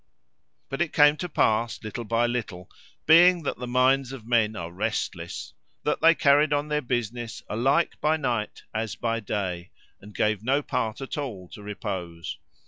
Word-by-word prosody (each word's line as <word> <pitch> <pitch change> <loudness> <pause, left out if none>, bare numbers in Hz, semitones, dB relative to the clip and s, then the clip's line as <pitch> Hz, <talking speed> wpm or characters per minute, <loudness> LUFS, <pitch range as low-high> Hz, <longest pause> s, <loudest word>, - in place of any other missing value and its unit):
But 135 - -4
it 170 - 0
came 145 0 +6
to 180 - -4
pass, 115 -5 +1
little 110 +2 -5
by 115 +2 +2
little, 110 -7 -4 0.3
being 170 +2 +7
that 140 - -3
the 125 - -5
minds 130 +1 +2
of 130 -5 -9
men 115 -2 +2
are 85 -2 -5
restless, 90 - -3 0.3
that - - 0
they 165 +1 +7
carried 145 0 +4
on 145 +1 0
their 150 0 0
business 120 -2 -3
alike 135 +10 +1
by 155 +1 +2
night 120 -7 -2
as 110 -1 -2
by 115 -1 -1
day, 95 -5 -3 0.3
and 105 +1 -13
gave 105 -1 +1
no 135 +4 +1
part 115 -2 -2
at 135 +2 -4
all 100 -11 -6
to - - -11
repose. 90 -5 -5
120 Hz, 170 wpm, -26 LUFS, 105-140 Hz, 0.3 s, being